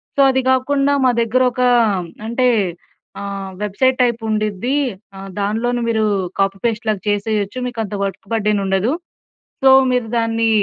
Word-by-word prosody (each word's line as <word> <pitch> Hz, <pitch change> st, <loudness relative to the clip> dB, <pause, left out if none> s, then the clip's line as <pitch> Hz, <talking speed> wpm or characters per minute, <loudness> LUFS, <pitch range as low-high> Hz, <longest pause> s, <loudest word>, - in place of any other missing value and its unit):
So, 280 Hz, -, +3 dB
అది 265 Hz, 0 st, +2 dB
కాకుండా 275 Hz, +2 st, +2 dB
మా 255 Hz, -, +5 dB
దగ్గర 230 Hz, +2 st, +1 dB
ఒక 250 Hz, -, -4 dB, 0.7 s
అంటే 250 Hz, +2 st, +1 dB, 0.7 s
ఆహ్, 200 Hz, -1 st, -5 dB
వెబ్‌సైట్ 255 Hz, +6 st, +1 dB
టైప్ 235 Hz, -1 st, 0 dB
ఉండుద్ది. 215 Hz, +5 st, -1 dB, 0.4 s
ఆహ్, 195 Hz, 0 st, -8 dB
దానిలోను 230 Hz, +4 st, -1 dB
మీరు 220 Hz, -1 st, +1 dB, 0.3 s
కాపీ 195 Hz, 0 st, +1 dB
పేస్ట్ 230 Hz, -1 st, -1 dB
లాగా 210 Hz, -3 st, 0 dB
చేసేయొచ్చు. 205 Hz, +1 st, -1 dB
మీకు 240 Hz, -2 st, -6 dB
అంత 210 Hz, -, -7 dB
వర్క్ 200 Hz, +3 st, -4 dB
బర్డెన్ 210 Hz, -2 st, +1 dB
ఉండదు. 195 Hz, +5 st, +1 dB, 0.7 s
సో, 265 Hz, -, +8 dB, 0.2 s
మీరు 250 Hz, -2 st, 0 dB
దాన్ని 225 Hz, 0 st, +1 dB
225 Hz, 145 wpm, -18 LUFS, 205-250 Hz, 0.7 s, సో